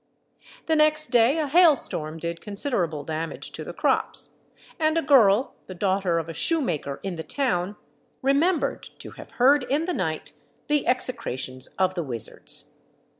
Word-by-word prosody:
The 320 - +2
next 305 0 +2
day 245 +4 +4
a 310 -2 0
hail 330 +1 +6
storm 155 - -1
did 170 +1 -5
considerable 200 - -1
damage 160 +2 -5
to - - -7
the - - -7
crops; - - 0 0.5
and 315 0 +2
a - - +3
girl, 245 -5 +4
the 185 - -8
daughter 190 -2 0
of 165 -1 -3
a 165 - -6
shoemaker 165 - 0
in 190 -3 -4
the 160 - -5
town, 200 - -1 0.5
remembered 290 +5 +1 0.2
to - - -10
have - - -12
heard 275 +3 +4
in 285 +6 0
the 360 - -2
night 160 - -3 0.4
the 295 -1 +1
execrations 130 - -2
of 185 -1 +2
the 175 - -2
wizards. 120 -8 -2
205 Hz, 160 wpm, -25 LUFS, -, 0.5 s, hail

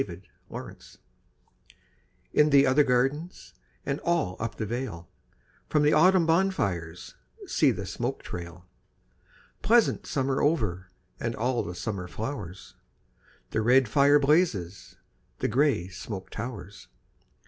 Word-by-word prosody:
VI - - -7 0.3
Autumn - - -6
Fires - - -17 1.4
In 150 0 +5
the 140 -1 +6
other 135 +3 +4
gardens 135 +6 -1 0.3
And 140 +2 -2
all 170 - 0
up 115 0 -4
the 110 - -3
vale, 110 -7 -5 0.6
From 150 -1 +2
the 150 - +4
autumn 180 +2 +5
bonfires 100 - -1 0.3
See - - +3
the - - -2
smoke - - -4
trail! 85 0 -8 1.0
Pleasant 235 0 +3
summer 135 -1 0
over 105 - 0 0.3
And 115 0 -2
all 125 +2 0
the 90 - -6
summer 90 0 -4
flowers, 100 -3 -6 0.8
The 110 - 0
red 125 +3 +4
fire 140 +5 +5
blazes, 135 - 0 0.4
The - - -1
grey 130 - +1
smoke 95 +1 -7
towers. 105 -5 -7
125 Hz, 125 wpm, -27 LUFS, 95-150 Hz, 1.4 s, the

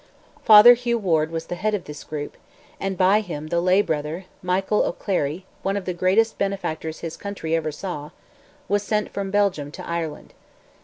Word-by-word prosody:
Father 215 +3 +10
Hugh 240 -1 -1
Ward 160 -7 +1
was 165 0 -4
the - - -5
head 210 +4 0
of 190 - -4
this 150 0 -9
group, 150 -1 -6 0.4
and 195 -1 -3
by 190 +3 +4
him 155 -6 -6
the 170 +1 +1
lay 185 +3 +4
brother 155 +3 -3 0.2
Michael 190 +3 +1
O'Clery, 175 -2 -2 0.2
one 195 +1 -1
of 195 - -5
the 180 - -2
greatest 190 +6 +2
benefactors 175 -5 -3
his 165 -1 -5
country 200 -6 -5
ever 155 -1 -1
saw, 150 -2 -6 0.6
was 205 0 +1
sent 210 +1 -1
from 200 -1 -3
Belgium 195 -8 +1
to - - -8
Ireland. 165 -3 -4
185 Hz, 175 wpm, -23 LUFS, 160-200 Hz, 0.6 s, Father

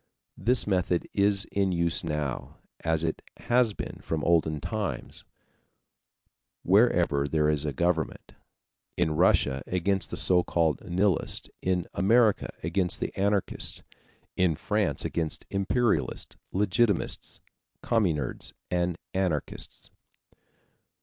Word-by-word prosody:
This 125 +1 +3
method 90 -3 0
is 100 -1 +3
in 100 -1 +1
use 85 -1 +1
now 75 -5 -3 0.3
as 80 -1 +1
it 80 -1 -2 0.2
has 120 -2 +2
been - - -6
from 80 -2 -3
olden 80 -3 +2
times 105 +6 -4 1.4
wherever 90 -8 +3
there 75 +1 +1
is 75 -1 +1
a 75 - -1
government: 85 +2 -1 0.6
in 85 -3 +2
Russia 75 -5 +3
against 95 +2 0
the - - -5
so 90 -1 +4
called 80 -5 0
Nihilists, 90 -1 0
in 90 -2 0
America 110 +2 +3
against 90 +2 0
Anarchists, 100 0 -1 0.5
in 90 -4 +2
France 100 -4 0
against 80 -2 -3
Imperialists, 105 +4 0 0.2
Legitimists, 100 +1 0 0.4
Communards, 85 - 0 0.2
and 90 -1 0 0.2
Anarchists. 90 -6 -3
90 Hz, 105 wpm, -27 LUFS, 80-100 Hz, 1.4 s, so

